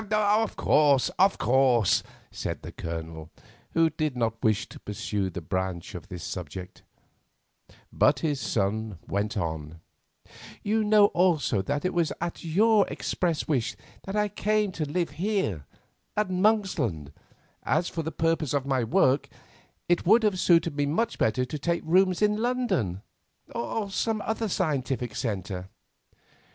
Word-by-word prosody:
"Of 215 +1 +2
course, 145 -3 +4
of 195 +1 +4
course," 125 -4 +3 0.3
said - - -5
the - - -7
Colonel, 80 -1 -6 0.5
who 165 -1 +4
did 155 -3 -2
not 115 -1 -1
wish 110 -3 +2
to - - -11
pursue 105 -1 -3
this 90 -1 -7
branch 95 +2 -3
of 90 -5 -8
the 90 - -7
subject, 90 +1 -7 1.1
but 140 -2 +3
his 150 -4 0
son 105 -2 -1
went 100 +2 -2
on: 80 -3 -4 0.8
"You 215 +1 +1
know 210 -1 +6
also 160 - +2
that 145 - -2
it 185 - 0
was 170 -3 +1
at 170 0 -4
your 205 +5 +4
express 170 -4 -2
wish 130 -7 0 0.3
that 195 - -4
I 210 0 +2
came 210 0 0
to 155 -5 -4
live 175 -1 -1
here 155 - -2 0.5
at 210 -3 +1
Monksland, 180 - +1 0.5
as 175 - +1
for 165 - -3
the 160 0 -4
purposes 165 -2 0
of 140 -2 0
my 135 -3 +1
work 130 +4 +2 0.6
it 175 0 +2
would 225 +4 +6
have 205 -4 +1
suited 170 -4 +3
me 145 -1 0
much 225 +11 -1
better 120 +3 +2
to 150 +4 -5
take 170 +4 -1
rooms 185 +3 +3
in 210 0 +3
London 225 - -1 0.5
or 200 - -3
some 220 +2 0
other 220 0 -1
scientific 135 - -1
centre." 95 -4 -3
150 Hz, 145 wpm, -27 LUFS, -, 1.1 s, know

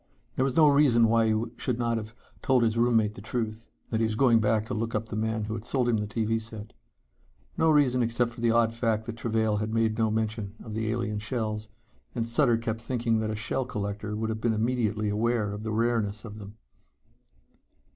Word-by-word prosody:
There 130 - +1
was 135 -1 0
no 155 -2 +7
reason 140 -6 +5
why 115 0 +3
he 110 +1 +1
should 125 -3 -1
not 120 -1 0
have 110 0 -7 0.3
told 130 -2 +3
his 110 -1 +1
roommate 115 -3 +2
the 95 - -10
truth 110 0 -4 0.2
that 110 - 0
he - - +2
was 110 -1 0
going 115 -2 +4
to 110 0 +1
look 115 +1 -2
up 110 +1 -1
the - - -4
man 110 0 -1
who 110 +1 -4
had 110 -1 -5
sold 125 0 0
him 120 -2 +2
the 105 0 -2
TV 110 +1 -1
set. 110 -1 -9 0.8
No 160 - +3
reason 140 -5 +4
except 120 0 +1
for 115 - -10
the 120 - +3
odd 115 0 +3
fact 115 -2 0
that 115 -1 -5
Travail 110 -2 0
had 110 +2 -2
made 110 -1 +1
no 110 -1 +3
mention 110 -1 -2
of 110 - -8
the 110 0 -2
alien 110 -2 -2
shells, 110 -1 -3 0.5
and 115 -2 -1
Sutter 120 0 +3
kept 115 -1 -3
thinking 115 -2 0
that 110 0 -2
a 110 - -2
shell 110 +5 -1
collector 105 -2 -4
would 110 +1 -2
have 110 0 -4
been 115 -1 +1
immediately 110 -2 0
aware 105 0 0
of 105 - -6
the 110 0 -4
rareness 110 -1 0
of 105 -1 -9
them. 105 +1 -11
110 Hz, 215 wpm, -27 LUFS, 110-120 Hz, 0.8 s, no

